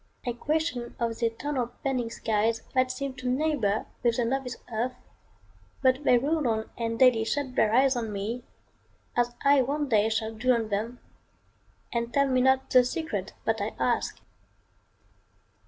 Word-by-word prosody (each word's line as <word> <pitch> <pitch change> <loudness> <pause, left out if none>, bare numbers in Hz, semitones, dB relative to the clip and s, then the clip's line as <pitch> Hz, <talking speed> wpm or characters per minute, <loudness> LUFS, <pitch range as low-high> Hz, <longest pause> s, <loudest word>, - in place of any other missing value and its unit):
I 245 - -1
question 285 -2 -2
of 230 -1 -1
th' - - -13
eternal 240 +2 -1
bending 255 -4 0
skies 225 0 0
That 255 0 +3
seem 275 +1 -4
to 255 - -3
neighbor 255 -7 +1 0.2
with 235 -1 +2
the 240 - +1
novice 255 +1 -2 0.2
earth; 245 +3 -1 0.9
But 260 +2 +3
they 250 - +6
roll 295 +2 0
on 220 -1 -1
and 230 -1 -2
daily 250 -3 +5
shut 265 +3 -2
their 215 - +3
eyes 260 +3 +4
On 230 -3 -2
me, 215 +5 -3 0.7
as 240 0 +1
I 280 -1 +6
one 285 +3 -1
day 215 -2 +3
shall 220 0 -1
do 250 +4 +2
on 225 -2 -2
them, 220 +4 -2 0.9
And 235 0 -1
tell 280 +1 +3
me 255 -1 +2
not 265 +1 +2
the 255 -1 +7
secret 315 +6 -3
that - - +1
I - - -3
ask. - - 0
245 Hz, 165 wpm, -27 LUFS, 230-265 Hz, 0.9 s, the